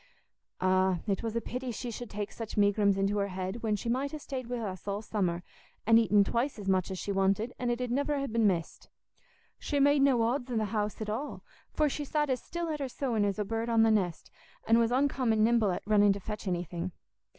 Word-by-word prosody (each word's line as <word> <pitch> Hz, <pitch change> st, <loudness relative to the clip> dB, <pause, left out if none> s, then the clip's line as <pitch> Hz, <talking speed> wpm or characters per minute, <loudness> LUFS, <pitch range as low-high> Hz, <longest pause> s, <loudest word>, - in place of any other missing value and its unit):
"Ah, 185 Hz, 0 st, +3 dB
it 200 Hz, -3 st, -1 dB
was 225 Hz, -1 st, -3 dB
a 230 Hz, -, 0 dB
pity 250 Hz, +2 st, -5 dB
she 240 Hz, +1 st, -5 dB
should 240 Hz, 0 st, -7 dB
take 205 Hz, -1 st, -4 dB
such 225 Hz, -2 st, -7 dB
megrims 205 Hz, -1 st, +3 dB
into 200 Hz, +1 st, +1 dB
her 200 Hz, -, 0 dB
head, 190 Hz, +4 st, -4 dB
when 215 Hz, -2 st, +1 dB
she 205 Hz, -, -5 dB
might 265 Hz, +4 st, 0 dB
ha' 310 Hz, -, -4 dB
stayed 265 Hz, -4 st, -6 dB
wi' 245 Hz, 0 st, -3 dB
us 195 Hz, -5 st, -5 dB
all 200 Hz, +2 st, -2 dB
summer, 180 Hz, -5 st, -1 dB, 0.4 s
and 225 Hz, +1 st, +6 dB
eaten 210 Hz, -3 st, +4 dB
twice 240 Hz, +7 st, -1 dB
as 205 Hz, -2 st, -7 dB
much 185 Hz, -1 st, +2 dB
as 190 Hz, -, -4 dB
she 200 Hz, -, -3 dB
wanted, 195 Hz, +4 st, +1 dB
and 245 Hz, -, -1 dB
it 240 Hz, 0 st, 0 dB
'ud 250 Hz, -1 st, -2 dB
niver 285 Hz, +3 st, 0 dB
ha' 275 Hz, -, -1 dB
been 225 Hz, -2 st, +2 dB
missed. 170 Hz, -4 st, -2 dB, 0.7 s
She 290 Hz, -, -1 dB
made 285 Hz, 0 st, +4 dB
no 265 Hz, -4 st, +4 dB
odds 245 Hz, +2 st, -1 dB
in 240 Hz, -, -1 dB
th' 215 Hz, -2 st, 0 dB
house 210 Hz, 0 st, -2 dB
at 215 Hz, -, -3 dB
all, 270 Hz, +7 st, -4 dB, 0.3 s
for 305 Hz, -, +1 dB
she 290 Hz, +1 st, -3 dB
sat 295 Hz, 0 st, 0 dB
as 255 Hz, -, -1 dB
still 340 Hz, 0 st, -4 dB
at 305 Hz, -1 st, -2 dB
her 275 Hz, -2 st, -3 dB
sewing 240 Hz, -5 st, -1 dB
as 200 Hz, 0 st, -1 dB
a 210 Hz, -, -1 dB
bird 225 Hz, +3 st, -2 dB
on 225 Hz, -1 st, +4 dB
the 225 Hz, -, +4 dB
nest, 185 Hz, -6 st, -1 dB, 0.4 s
and 230 Hz, +1 st, +5 dB
was 230 Hz, -1 st, +3 dB
uncommon 255 Hz, -4 st, +2 dB
nimble 230 Hz, -2 st, +3 dB
at 180 Hz, -, -2 dB
running 205 Hz, -1 st, +5 dB
to 200 Hz, -, -6 dB
fetch 210 Hz, +1 st, -6 dB
anything. 175 Hz, 0 st, -3 dB
220 Hz, 240 wpm, -30 LUFS, 200-250 Hz, 0.7 s, and